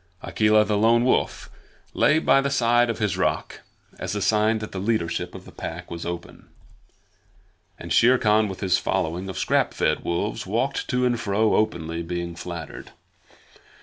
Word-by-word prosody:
Akela 105 Hz, 0 st, +3 dB
the 105 Hz, -1 st, 0 dB
Lone 115 Hz, +2 st, +4 dB
Wolf 130 Hz, -, 0 dB, 0.5 s
lay 155 Hz, -, +3 dB
by 135 Hz, -3 st, +4 dB
the 140 Hz, -, -1 dB
side 120 Hz, -2 st, +3 dB
of 115 Hz, -, -2 dB
his 105 Hz, -4 st, -1 dB
rock 95 Hz, -, -2 dB, 0.4 s
as -, -, -4 dB
a -, -, -1 dB
sign 110 Hz, +2 st, +2 dB
that 110 Hz, 0 st, -7 dB
the 95 Hz, -, -5 dB
leadership 100 Hz, -4 st, -2 dB
of -, -, -10 dB
the -, -, -12 dB
Pack -, -, -7 dB
was 85 Hz, 0 st, -5 dB
open, 85 Hz, 0 st, -7 dB, 1.3 s
and -, -, -5 dB
Shere 125 Hz, +2 st, +5 dB
Khan 110 Hz, -2 st, +3 dB
with 95 Hz, -2 st, -7 dB
his 95 Hz, -2 st, +2 dB
following 90 Hz, 0 st, -2 dB
of 95 Hz, -, -6 dB
scrap 75 Hz, -, +1 dB
fed -, -, 0 dB
wolves 105 Hz, +5 st, -2 dB
walked 125 Hz, +7 st, -1 dB
to 125 Hz, 0 st, 0 dB
and 120 Hz, -1 st, +1 dB
fro 105 Hz, 0 st, +1 dB
openly 85 Hz, -5 st, -1 dB
being 85 Hz, 0 st, -4 dB
flattered. 85 Hz, -3 st, -8 dB
105 Hz, 170 wpm, -24 LUFS, 90-115 Hz, 1.3 s, Shere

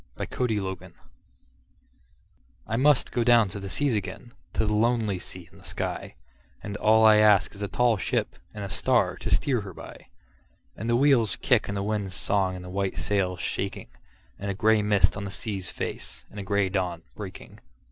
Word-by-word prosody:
Y -, -, -2 dB
Z -, -, -17 dB, 0.2 s
Sea 110 Hz, -3 st, 0 dB, 0.2 s
Fever -, -, -15 dB, 1.7 s
I 110 Hz, -, -2 dB
MUST 140 Hz, +3 st, +3 dB
down 115 Hz, -3 st, +5 dB
to 100 Hz, -, -6 dB
the 100 Hz, 0 st, -6 dB
seas 140 Hz, +2 st, +1 dB
again, 110 Hz, +4 st, -5 dB, 0.2 s
to 110 Hz, -, +1 dB
the 105 Hz, -, 0 dB
lonely 110 Hz, -3 st, +1 dB
sea 90 Hz, -1 st, -9 dB
and -, -, -17 dB
the -, -, -17 dB
sky, -, -, -4 dB, 0.5 s
And 100 Hz, -1 st, -5 dB
all 110 Hz, +1 st, +5 dB
I 110 Hz, -1 st, +8 dB
ask 105 Hz, -5 st, +5 dB
is 100 Hz, -, -11 dB
a 100 Hz, -, -1 dB
tall 120 Hz, +1 st, +2 dB
ship -, -, -1 dB, 0.2 s
and 105 Hz, -1 st, -7 dB
a 100 Hz, -, -5 dB
star 95 Hz, -1 st, +2 dB
to -, -, -5 dB
steer 130 Hz, -6 st, +2 dB
her 95 Hz, -3 st, -9 dB
by, -, -, -11 dB, 0.7 s
And 110 Hz, +3 st, -4 dB
the 120 Hz, -, +3 dB
wheel's 125 Hz, -5 st, +4 dB
kick 125 Hz, -6 st, +2 dB
and 100 Hz, -, -3 dB
the 100 Hz, -, -1 dB
wind's 100 Hz, -3 st, -2 dB
song 95 Hz, +5 st, 0 dB
and 90 Hz, 0 st, -8 dB
the -, -, -8 dB
white 95 Hz, 0 st, -2 dB
sail's 95 Hz, -3 st, -1 dB
shaking, -, -, -3 dB, 0.5 s
And 100 Hz, -, -4 dB
a 100 Hz, -, -2 dB
gray 110 Hz, +1 st, +3 dB
mist 105 Hz, -1 st, +3 dB
on 100 Hz, -, -5 dB
the 100 Hz, -, -4 dB
sea's 95 Hz, -2 st, -4 dB
face, -, -, -5 dB
and 105 Hz, -, -8 dB
a -, -, -4 dB
gray 100 Hz, 0 st, +1 dB
dawn 90 Hz, -3 st, -2 dB
breaking. 100 Hz, -3 st, -9 dB
105 Hz, 200 wpm, -26 LUFS, 95-110 Hz, 1.7 s, I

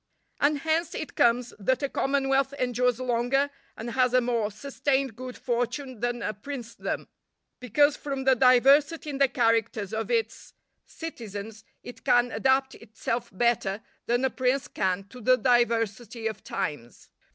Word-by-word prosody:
And 290 Hz, +1 st, +3 dB
hence 320 Hz, +3 st, -1 dB
it 310 Hz, -, -5 dB
comes 240 Hz, +1 st, +2 dB
that 260 Hz, +7 st, 0 dB
a -, -, +2 dB
commonwealth 270 Hz, 0 st, +1 dB
endures 250 Hz, -1 st, +1 dB
longer, 255 Hz, +3 st, +1 dB, 0.3 s
and 235 Hz, +2 st, -5 dB
has 255 Hz, 0 st, +2 dB
a -, -, +7 dB
more 235 Hz, -3 st, 0 dB
sustained 270 Hz, +2 st, -1 dB
good 255 Hz, +1 st, -8 dB
fortune 245 Hz, +1 st, -2 dB
than 240 Hz, +1 st, -2 dB
a -, -, -2 dB
princedom, 235 Hz, +1 st, -5 dB, 0.5 s
because 285 Hz, +5 st, +3 dB
from 275 Hz, -2 st, -4 dB
the 265 Hz, 0 st, +5 dB
diversity 275 Hz, +5 st, +4 dB
in 275 Hz, -, -5 dB
the 275 Hz, -, +5 dB
characters 230 Hz, -4 st, 0 dB
of 225 Hz, 0 st, -2 dB
its 460 Hz, -2 st, -2 dB, 0.3 s
citizens, 220 Hz, -8 st, -7 dB, 0.2 s
it 245 Hz, -, -11 dB
can 245 Hz, 0 st, +3 dB
adapt 265 Hz, +1 st, +2 dB
itself 230 Hz, +2 st, -4 dB
better 215 Hz, -1 st, 0 dB, 0.2 s
than 245 Hz, +2 st, +2 dB
a 260 Hz, -, +1 dB
prince 260 Hz, +3 st, 0 dB
can 190 Hz, -4 st, -1 dB
to 250 Hz, -, -11 dB
the 255 Hz, +3 st, +4 dB
diversity 235 Hz, -2 st, +1 dB
of 220 Hz, -2 st, -3 dB
times. 120 Hz, -6 st, -5 dB
245 Hz, 150 wpm, -27 LUFS, 230-270 Hz, 0.5 s, a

